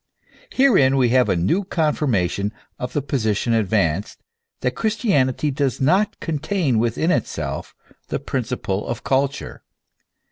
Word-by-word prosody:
Herein 185 - +4
we 125 -2 +3
have 125 +1 +3
a - - +2
new 95 - +1
con 160 -5 0
firmation 100 - 0 0.3
of 125 - -4
the 145 - -1
position 115 -4 0
advanced, 100 -5 0 0.4
that 125 0 0
Christianity 150 - +1
does 135 -2 -1
not 185 +10 +2
contain 155 - 0
within 120 +9 +1
itself 75 - -3 0.3
the - - -2
principle 95 +1 -3
of 120 +1 -4
culture. 135 +1 -1
130 Hz, 130 wpm, -21 LUFS, 110-155 Hz, 0.4 s, Herein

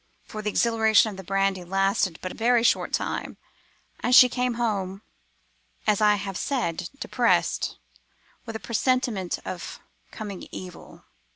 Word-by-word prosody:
For 215 - -7
the 210 - -1
exhilaration 220 -1 +3
of 195 - -10
the 190 - -8
brandy 195 0 0
lasted 195 -1 0
but 185 - -3
a - - -10
very 235 +1 +3
short - - +2
time, - - -3 0.6
and 245 - +2
she 250 - +9
came 250 -1 -1
home, 200 -4 -2 0.8
as 210 -1 +2
I 210 -1 +5
have 195 -2 -5
said, 180 - -2
depressed, - - +1 0.7
with 225 - -6
a - - -3
presentiment 230 -6 0
of 180 -2 -6 0.3
coming 205 -4 -7
evil. 180 -2 -10
210 Hz, 145 wpm, -25 LUFS, 190-230 Hz, 0.8 s, she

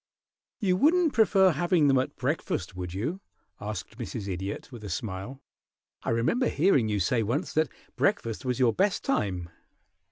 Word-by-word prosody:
"You 185 -5 +2
wouldn't 320 - +4
prefer 195 -4 +5
having 170 0 +2
them 135 -2 +4
at 130 - -2
breakfast, 125 - -2
would 90 -1 -5
you?" 155 - -3 0.4
asked 105 +1 -6
Mrs. 115 -3 -5
Idiot, 95 +5 -4
with 120 -4 -10
a 105 - -6
smile. 100 +8 -5 0.6
"I - - -3
remember 120 - +2
hearing 140 - +3
you 105 -1 0
say 115 +6 +2
once 140 - -1
that 155 -3 +2 0.3
breakfast 115 -2 0
was 125 -1 -1
your 125 -3 +3
best 195 +1 +1
time." 90 - -1
125 Hz, 160 wpm, -28 LUFS, -, 0.6 s, prefer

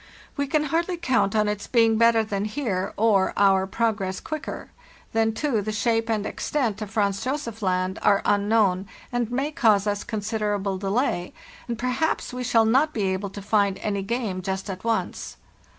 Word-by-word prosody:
We 285 -1 -1
can 305 +1 +1
hardly 335 +4 -1
count 250 - +1
on 210 -1 +3
its 210 0 -3
being 225 -2 +3
better 230 -1 +5
than 205 -1 -2
here, 210 -5 -2
or 205 -3 +3
our 195 -1 +4
progress 195 -3 -1
quicker. 310 -2 -6 0.4
Then, 225 0 +2
too, 225 -1 0
the 215 +2 -3
shape 225 +2 0
and 215 -2 0
extent 230 -7 -2
of 210 - -4
Franz 200 -2 0
Josef 255 -5 -3
Land 185 -1 0
are 200 -1 +3
un 205 0 +2
known, 200 -4 +2 0.2
and 245 -2 -1
may 270 +5 -1
cause 220 - +3
us 205 -1 -1
considerable 205 -3 -2
delay, 195 -2 -1 0.3
and 235 -1 -3
per 250 +2 -1
haps 265 +1 -1
we 250 0 -4
shall 230 -2 +3
not 270 +7 +3
be 215 - 0
able 195 +1 -3
to 195 +1 -9
find 200 -2 +2
any 200 0 -2
game 200 -3 -2
just 190 +1 -3
at 185 0 -8
once. 230 -1 -2
215 Hz, 180 wpm, -24 LUFS, 200-240 Hz, 0.4 s, better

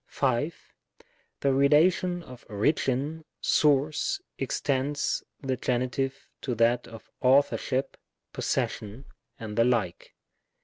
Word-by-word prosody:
5. 135 +4 -1 0.7
The 140 -1 +3
relation 170 +6 +3
of 125 -4 -12
origin, 140 +7 0 0.2
source, 150 - +2 0.2
extends 140 +1 -1 0.2
the 130 -1 0
Gen 125 0 0
itive 135 +1 -1 0.3
to 125 -3 -2
that 115 +2 +2
of 115 -2 -12
authorship, 135 0 +2 0.4
possession, 110 +6 -2 0.3
and 110 -2 -6
the 115 - +4
like. 115 -8 -1
135 Hz, 100 wpm, -27 LUFS, 120-145 Hz, 0.7 s, the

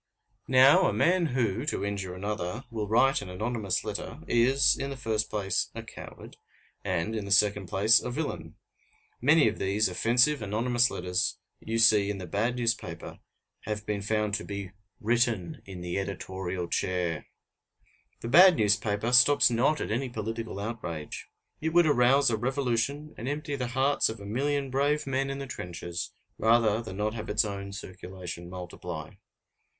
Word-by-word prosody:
Now, 135 +8 +6
a - - 0
man 180 -1 +2
who, 120 -4 -1
to 150 - -1
injure 95 -3 -4
another, 100 +3 -4
will 110 -2 -3
write 125 +5 +3
an 100 - -8
anonymous 105 +1 -2
letter, - - -6
is, 125 +2 +4
in 140 - -4
the 140 - -6
first 110 -3 -1
place, 100 -3 -1
a - - -6
coward, - - -11 0.5
and, 95 +3 -1
in 105 -2 -3
the 100 - -7
second 100 -1 +3
place, 105 +6 +4
a - - -4
villain. 150 +5 -4 0.7
Many 150 +3 +5
of 110 - -2
these 100 +3 +1
offensive 120 +9 +2
anonymous 120 +4 +1
letters 90 0 -1 0.2
you 115 +1 -3
see 110 -3 +5
in 105 - -3
the 95 - -6
bad 105 +8 -1
newspaper 115 -8 -3 0.5
have 105 0 -4
been 105 -1 -2
found 105 0 -1
to 105 - -1
be 100 -2 -6 0.3
written 115 -5 0
in 95 -2 -9
the 90 +2 -2
editorial 95 -2 -4
chair. 90 -3 -2 0.9
The - - -5
bad 180 +7 +8
newspaper 105 +1 +1
stops 125 +2 +6
not 130 +7 +2
at - - -3
any 125 +4 -1
political 115 -2 -5
outrage. 95 -8 -6 0.3
It 160 +1 -1
would 175 0 +6
arouse 135 -2 +4
a 110 - 0
revolution, 135 +4 -1
and 120 - -5
empty 145 0 -3
the 125 -3 -3
hearts 140 +2 +2
of 110 -1 -6
a 100 - -10
million 135 +5 -1
brave 145 +3 +1
men 135 0 -1
in 135 - -4
the 140 - -5
trenches, 85 -7 -6 0.3
rather 110 -1 +3
than 95 -5 -8
not 105 +1 -1
have 110 -2 -6
its 105 +1 +2
own 100 -1 -5
circulation 90 -3 -8
multiply. 90 -1 -7
110 Hz, 165 wpm, -28 LUFS, 100-125 Hz, 0.9 s, bad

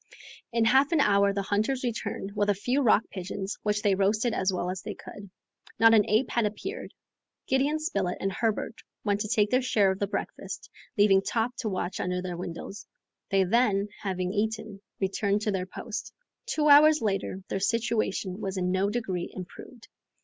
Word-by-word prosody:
In 230 -1 +2
half 270 +6 +4
an 330 - +3
hour 200 -6 +4
the 200 0 -2
hunters 215 +7 0
returned 215 -4 -4
with 205 0 +1
a 205 - +3
few 250 +8 0
rock 225 -3 +4
pigeons, 195 +1 -5
which 210 0 -1
they 205 - +3
roasted 210 +5 +1
as 190 -2 +1
well 180 -1 -2
as 185 0 -5
they - - -6
could. 200 -1 -11 0.5
Not 225 0 +7
an 210 -2 +4
ape 220 +4 +2
had 235 -3 +2
appeared. 385 - -6 0.5
Gideon 275 +3 +1
Spilett 200 - -2
and 195 - -1
Herbert 225 +2 -2 0.2
went 205 -2 +1
to 210 - -2
take 210 -2 +2
their 255 +1 +3
share 210 -6 +3
of 190 - -4
the 200 - 0
breakfast, - - -5 0.3
leaving 200 -2 +5
Top 230 +4 -1
to 220 - -2
watch 185 -1 -3
under 180 0 -1
the 180 -1 -4
windows. 175 +3 -7 0.4
They 195 -1 +3
then, 205 0 +2
having 185 -2 -2
eaten, 215 -1 -2 0.2
returned 200 +1 0
to 210 - 0
their 185 -1 -2
post. 215 +2 -6 0.4
Two 305 -10 +1
hours 300 -1 +7
later, 195 -2 -2
their 195 - -1
situation 215 -3 -1
was 195 -2 -3
in 180 0 0
no 190 +2 +1
degree 195 -6 -3
improved. 190 +6 -10
205 Hz, 185 wpm, -27 LUFS, 195-230 Hz, 0.5 s, Not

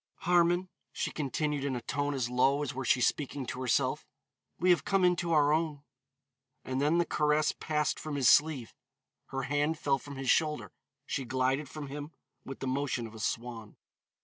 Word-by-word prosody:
"Harmon," 175 +1 +3 0.2
she - - -3
continued 150 0 -2
in 140 -2 -1
a 120 - -4
tone 145 +3 -2
as 130 -3 -1
low 130 +4 +2
as 140 -1 -3
were 135 +1 -4
she 125 +1 +3
speaking 140 +2 0
to 125 - -5
herself, 125 -2 0 0.5
"we 180 +1 +4
have 165 -5 +3
come 195 0 +2
into 175 -1 +1
our 150 -2 +4
own." 155 -3 -1 0.8
And 130 +1 -2
then 150 +4 +3
the 175 - +3
caress 150 -1 +2
passed 150 -1 -1
from 155 -2 -5
his 135 -4 +2
sleeve, 145 -6 +4 0.5
her 135 0 -4
hand 145 +3 0
fell 140 -2 +1
from 140 +1 -9
his 135 -1 +1
shoulder, 150 - +1 0.3
she 135 - -2
glided 130 +3 0
from 150 +2 -6
him 145 +3 -7 0.3
with 135 - -8
the 135 - -2
motion 130 -2 -1
of 110 - -10
a 110 - -10
swan. 115 0 -4
145 Hz, 185 wpm, -30 LUFS, 130-155 Hz, 0.8 s, we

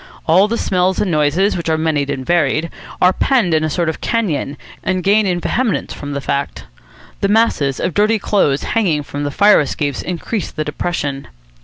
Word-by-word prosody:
All 185 +5 +4
the 230 +2 -2
smells 185 -2 0
and 195 - 0
noises, 155 +6 +2
which 170 -2 -3
are 160 - +2
many 155 -2 0
and 130 -2 -4
varied, 165 0 +1 0.3
are 180 +1 +4
penned 230 -10 +1
up - - +4
in - - -4
a 155 - 0
sort 170 +2 -1
of 160 - -3
canyon, 165 -11 -1 0.3
and 185 -1 -1
gain 205 +1 +3
in 180 -1 0
vehemence 235 +4 -1
from 145 0 -7
the 140 - -2
fact. 140 +1 -3 0.6
The 200 - +1
masses 200 - +1
of 180 - -1
dirty 215 +5 +3
clothes 190 -9 +1
hanging 175 -10 0
from 145 +1 -5
the - - -1
fire 205 +8 +5
escapes 145 -1 -2
increase 180 +2 -4
the 155 - -4
depression. 150 -3 -3
170 Hz, 195 wpm, -17 LUFS, 145-200 Hz, 0.6 s, fire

